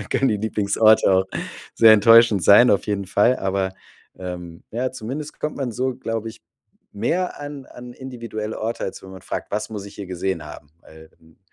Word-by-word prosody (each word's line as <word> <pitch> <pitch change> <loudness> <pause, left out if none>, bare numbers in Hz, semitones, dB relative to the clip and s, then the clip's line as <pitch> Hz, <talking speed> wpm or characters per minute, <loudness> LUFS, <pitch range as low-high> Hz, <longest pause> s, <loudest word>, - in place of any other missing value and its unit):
Da - - -4
können 135 - +1
die 105 - +1
Lieblingsorte 110 0 +3
auch 95 0 +3 0.5
sehr 110 -1 +7
enttäuschend 115 -2 +6
sein, 105 +8 +7
auf 100 - +1
jeden 100 -1 -2
Fall. 110 +6 +3
Aber, 95 0 -1 0.5
ähm, 90 -2 -8
ja, 125 +3 -2
zumindest 140 +7 -7
kommt 150 - -3
man 130 -4 -3
so, 130 +3 -2
glaube 115 -3 -4
ich 110 - -12 0.5
mehr 165 - -2
an 145 -2 -7
an 125 -1 -12
individuelle 115 -5 -6
Orte, 115 +2 -3
als 95 - -6
wenn 95 - -11
man 95 0 -11
fragt: - - -5
„Was 105 +2 -3
muss 105 -2 -6
ich 100 - -12
hier 100 - -8
gesehen 90 -2 -3
haben?“ 75 -1 -11
Weil, 80 0 -16
hm 80 +1 -24
110 Hz, 195 wpm, -22 LUFS, 95-120 Hz, 0.5 s, sehr